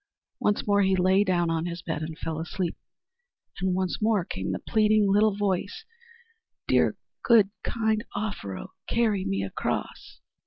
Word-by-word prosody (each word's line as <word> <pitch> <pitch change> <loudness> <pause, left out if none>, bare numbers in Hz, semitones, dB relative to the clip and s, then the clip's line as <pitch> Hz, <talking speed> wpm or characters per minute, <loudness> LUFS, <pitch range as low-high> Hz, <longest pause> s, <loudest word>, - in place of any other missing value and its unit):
Once 205 - +1
more 205 -1 +3
he 190 -1 +3
lay 185 +2 +4
down 175 -3 +1
in 165 +1 -1
his 170 -1 -6
bed 160 -3 -3
and 155 0 -5
fell 160 -1 -4
asleep. 170 +1 -3 0.8
And 185 0 0
once 185 +1 -1
more 210 -5 +2
came 95 - -4
the 95 - -1
pleading 215 - +2
little 205 +1 +3
voice, 205 - -2 0.8
"Dear, - - +3 0.2
good, 215 -4 +5
kind 220 -2 0
Offero, 200 - -4 0.2
carry 215 -5 +1
me 95 0 -1
across!" 95 - -4
190 Hz, 150 wpm, -27 LUFS, 170-210 Hz, 0.8 s, good